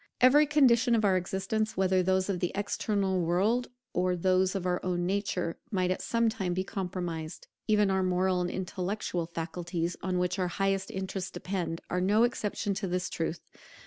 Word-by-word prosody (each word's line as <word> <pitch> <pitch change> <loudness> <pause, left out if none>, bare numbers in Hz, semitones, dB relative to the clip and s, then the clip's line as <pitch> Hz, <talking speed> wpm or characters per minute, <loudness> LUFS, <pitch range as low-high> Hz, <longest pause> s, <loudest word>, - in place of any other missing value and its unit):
Every 290 +4 +6
condition 250 -5 +4
of 220 -2 +2
our 190 -2 +4
existence, 195 +4 -1
whether 190 -1 +3
those 185 0 +1
of 195 -3 -1
the 180 - -1
external 200 -2 0
world 200 +9 +1 0.3
or 180 0 +1
those 185 +2 +2
of 190 -2 -2
our 180 -1 0
own 175 -1 -1
nature, 190 -3 -1
might 185 -4 +1
at 185 - -2
some 230 0 +1
time 195 -6 -1
be 185 - 0
compromised. 175 -5 -4 0.2
Even 210 -2 +3
our 190 0 +2
moral 185 0 +1
and 175 - -1
intellectual 185 -1 -3
faculties, 170 +1 -3
on 185 -1 -1
which 180 +1 0
our 180 - +1
highest 195 +1 0
interests 190 0 -4
depend, 180 -3 -4
are 180 - +1
no 205 +5 +4
exception 210 -4 -1
to 195 0 -3
this 180 0 -2
truth. 165 +1 -3
185 Hz, 175 wpm, -29 LUFS, 180-200 Hz, 0.3 s, Every